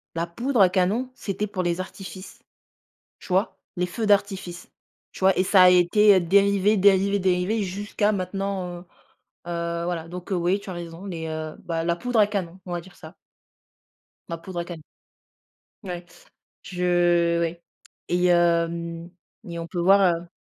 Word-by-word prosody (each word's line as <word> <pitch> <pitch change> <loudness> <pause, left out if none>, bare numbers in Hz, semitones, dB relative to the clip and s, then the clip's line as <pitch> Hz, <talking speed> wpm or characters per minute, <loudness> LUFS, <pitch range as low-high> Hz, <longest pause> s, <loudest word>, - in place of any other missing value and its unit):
la 165 +1 -1
poudre 235 +6 0
à 185 - +7
canon, 200 +8 0
c'était 205 -2 -4
pour 185 -2 -3
les 175 +1 -1
artifices, 185 0 -8 0.8
tu - - -14
vois? 190 +3 0 0.2
Les 180 0 0
feux 215 +5 -3
d'artifice, 195 -3 0 0.4
tu - - -12
vois 190 +1 +4
et 185 - +3
ça 190 -1 +5
a 180 - +8
été, 195 +4 +5
heu, - - +4
dérivé, 200 +3 +3
dérivé, 200 +1 +4
dérivé 190 +3 +1
jusqu'à 205 +2 -1
maintenant, 190 -2 -3
heu, - - -15 0.7
heu, 170 0 -2
voilà, 165 -2 -3
donc, 180 +2 -8
heu, - - +2
oui, 180 +4 +1
tu 195 - -9
as - - -5
raison 170 +2 -8
les, 165 -3 -5
heu, 155 0 -5
bah, 165 -1 -2
la 170 0 0
poudre 245 +1 0
à 205 - +6
canon, 190 -3 -4
on 175 - -6
va 175 - -2
dire 180 +2 -17
ça. 160 +3 -12 1.2
La 170 - -4
poudre 175 +1 -7
à 170 - -3
canon. 170 -3 -8 1.0
Ouais, 175 -2 -6 0.6
je 175 -2 +2
oui 170 0 -2 0.5
et 180 +1 +1
hem 170 -1 +1 0.3
et 170 -1 -7
on 165 - -5
peut 175 +1 -5
voir, 195 +3 +5
heu 170 +1 -6
180 Hz, 175 wpm, -24 LUFS, 170-195 Hz, 1.2 s, a